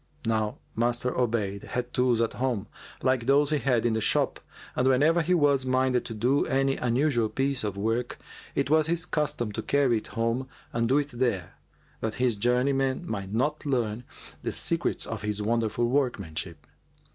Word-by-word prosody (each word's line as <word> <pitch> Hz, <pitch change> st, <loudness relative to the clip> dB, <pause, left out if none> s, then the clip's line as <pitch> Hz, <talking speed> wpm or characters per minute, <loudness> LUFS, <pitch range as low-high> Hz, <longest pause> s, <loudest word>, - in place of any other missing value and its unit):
Now 110 Hz, -1 st, 0 dB, 0.2 s
Master 120 Hz, +2 st, +1 dB
Obayd 110 Hz, -5 st, 0 dB
had 125 Hz, 0 st, -4 dB
tools 125 Hz, -2 st, +2 dB
at 115 Hz, -, 0 dB
home, 125 Hz, -6 st, -1 dB, 0.4 s
like 130 Hz, -2 st, +1 dB
those 145 Hz, +2 st, +4 dB
he 150 Hz, -, +2 dB
had 120 Hz, -2 st, +1 dB
in 120 Hz, -, +2 dB
the 110 Hz, -, 0 dB
shop, -, -, +1 dB, 0.4 s
and 130 Hz, -, +2 dB
whenever 150 Hz, +6 st, +4 dB
he 180 Hz, +3 st, +2 dB
was 145 Hz, -4 st, +3 dB
minded 130 Hz, -1 st, +1 dB
to 115 Hz, -, -5 dB
do 125 Hz, +6 st, +2 dB
any 135 Hz, 0 st, +1 dB
unusual 120 Hz, -2 st, +1 dB
piece 135 Hz, -1 st, 0 dB
of 105 Hz, -2 st, -3 dB
work, 115 Hz, +4 st, -1 dB, 0.4 s
it 140 Hz, -, 0 dB
was 155 Hz, 0 st, +4 dB
his 170 Hz, +1 st, 0 dB
custom 145 Hz, -9 st, -1 dB
to -, -, -4 dB
carry 135 Hz, -5 st, +2 dB
it 110 Hz, -, -6 dB
home 115 Hz, +3 st, -1 dB, 0.3 s
and 115 Hz, 0 st, 0 dB
do 135 Hz, -, +4 dB
it 145 Hz, -1 st, 0 dB
there, 120 Hz, -8 st, -1 dB, 0.5 s
that 110 Hz, -1 st, -3 dB
his 125 Hz, -3 st, +2 dB
journeymen 130 Hz, -, +1 dB
might 100 Hz, -2 st, -4 dB
not 145 Hz, +8 st, 0 dB
learn 120 Hz, -5 st, -1 dB, 0.4 s
the -, -, -2 dB
secrets -, -, -1 dB
of -, -, -5 dB
his 105 Hz, -1 st, -2 dB
wonderful 115 Hz, +2 st, 0 dB
workmanship. 95 Hz, -, -2 dB
125 Hz, 175 wpm, -27 LUFS, 110-135 Hz, 0.5 s, those